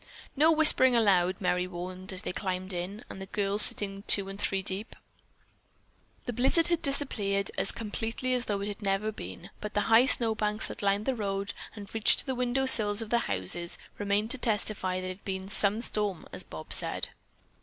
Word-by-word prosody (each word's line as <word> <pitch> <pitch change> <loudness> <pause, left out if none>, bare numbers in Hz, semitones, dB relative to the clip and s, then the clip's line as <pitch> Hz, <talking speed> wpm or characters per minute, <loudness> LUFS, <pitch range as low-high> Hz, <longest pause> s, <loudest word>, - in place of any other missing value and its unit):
"No 310 +3 +4
whispering 305 -5 +6
allowed," 190 -5 +2
Merry 180 -1 -1
warned 185 +1 -7
as 185 -1 -5
they - - -4
climbed 185 -1 -4
in, 185 +6 -6
the 190 0 -10
girls 200 +1 +1
sitting 200 -1 +4
two 195 -1 +5
and 195 +1 -9
three 195 -1 -1
deep. 195 +3 +2 1.3
The 245 - -4
blizzard 270 +9 +3
had 340 -2 0
disappeared 205 -8 -2
as - - 0
completely 225 +3 -4
as 250 -1 0
though 200 -1 -3
it 205 +1 -6
never 195 +1 -2
had 215 -1 -4
been, 90 0 -10
but 210 0 -8
the 205 - +1
high 240 +3 +6
snowbanks 220 -4 0
that - - -8
lined 200 +1 -1
the 265 - 0
road 200 -3 -4 0.2
and 205 -2 -11
reached 225 -2 +3
to - - -13
the 265 - -3
window 250 +1 -1
sills 215 -4 +5
of 215 - -12
the 235 - +2
houses 100 - 0 0.2
remained 205 +2 -1
to 265 - -4
testify 210 -5 -2
that 185 - -7
it 185 0 -6
had - - -33
been 190 -1 -6
"some 205 +3 +4
storm," 205 -7 0
as - - -5
Bob - - -6
said. - - -2
205 Hz, 195 wpm, -28 LUFS, 190-225 Hz, 1.3 s, whispering